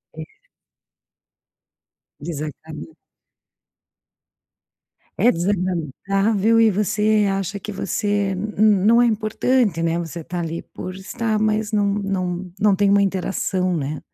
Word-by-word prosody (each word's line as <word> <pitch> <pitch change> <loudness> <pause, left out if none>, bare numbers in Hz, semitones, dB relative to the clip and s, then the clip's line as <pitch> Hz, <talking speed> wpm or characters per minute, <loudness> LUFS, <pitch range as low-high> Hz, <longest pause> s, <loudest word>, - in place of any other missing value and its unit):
É. - - -6 2.0
Exatamen 155 - -7 2.2
É 245 - +4
desagradável 195 - 0
e 225 -1 +6
você 210 +1 +1
acha 195 +1 -3
que 210 - -7
você 205 0 -1
n 210 +3 -4
n 205 -2 +4
não 235 +2 +6
é - - +5
importante, 215 -3 +1
né, 165 0 0
você 170 -1 -5
tá 175 +3 -5
ali 165 0 -4
por 185 0 -6
estar, 215 +3 -2
mas 215 0 0
não 210 -2 +2
não 185 -3 -3
não 210 -2 +4
tem 200 +1 +2
uma 200 0 +4
interação, 185 -1 -1
né. 150 -1 -3
195 Hz, 120 wpm, -21 LUFS, 180-215 Hz, 2.2 s, e